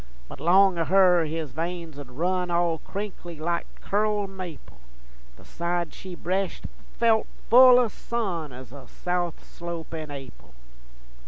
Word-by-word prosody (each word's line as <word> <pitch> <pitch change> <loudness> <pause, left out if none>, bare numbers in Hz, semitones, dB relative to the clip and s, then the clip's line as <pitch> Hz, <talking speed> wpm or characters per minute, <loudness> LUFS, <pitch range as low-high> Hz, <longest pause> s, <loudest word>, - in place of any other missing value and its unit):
But - - -10
long 185 +2 +5
o' 165 - +1
her 180 -2 +5
his 155 -2 -4
veins 165 0 -4
'ould 140 -3 -9
run 180 +7 -1
All 170 -1 +1
crinkly 190 -5 -7
like 170 +2 -1
curled 205 -1 0
maple, 165 - -9 0.6
The - - -17
side 170 0 -2
she 185 -2 -8
breshed 185 +2 -2 0.3
felt 225 -2 +3 0.2
full 250 +1 +9
o' 250 -1 +4
sun 195 - -3
Ez 125 -1 -11
a 135 -3 -11
south 175 +1 -3
slope 170 -2 -7
in 155 -2 -5
Ap'il. 135 - -10
175 Hz, 145 wpm, -26 LUFS, 160-190 Hz, 0.6 s, full